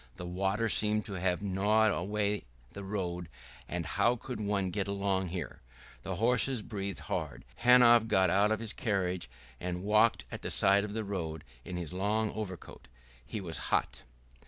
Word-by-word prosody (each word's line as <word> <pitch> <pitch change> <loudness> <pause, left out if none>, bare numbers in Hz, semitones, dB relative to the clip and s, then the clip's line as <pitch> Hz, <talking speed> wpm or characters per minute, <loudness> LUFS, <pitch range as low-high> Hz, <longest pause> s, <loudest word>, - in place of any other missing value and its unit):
The 90 - -7
water 95 +5 0
seemed 105 0 +1
to 100 - -6
have 90 +1 0
gnawed 105 +3 +3
away 100 -1 -1 0.3
the 100 - -7
road; 90 -4 -3 0.4
and 85 -1 -3
how 115 +10 +2
could 125 -1 -6
one 100 -3 0
get 100 +1 -2
along 100 -1 0
here! 85 -2 -5 0.4
The 95 - -4
horses 120 +3 +1
breathed 100 -3 -5
hard. - - -4
Hanov 120 -2 +6
got 95 -4 +3
out 100 +3 +3
of 110 - +1
his 115 -1 -5
carriage 95 - -1 0.3
and 90 0 -4
walked 105 +3 +3
at - - -6
the - - -4
side 100 +1 +4
of 105 -1 -5
the 110 0 -2
road 80 -6 -4 0.2
in 90 - -5
his 85 -1 -4
long 105 +3 0
overcoat. 95 -5 -7 0.4
He 110 - -5
was 85 -4 -4
hot. - - 0
100 Hz, 170 wpm, -31 LUFS, 90-110 Hz, 0.4 s, Hanov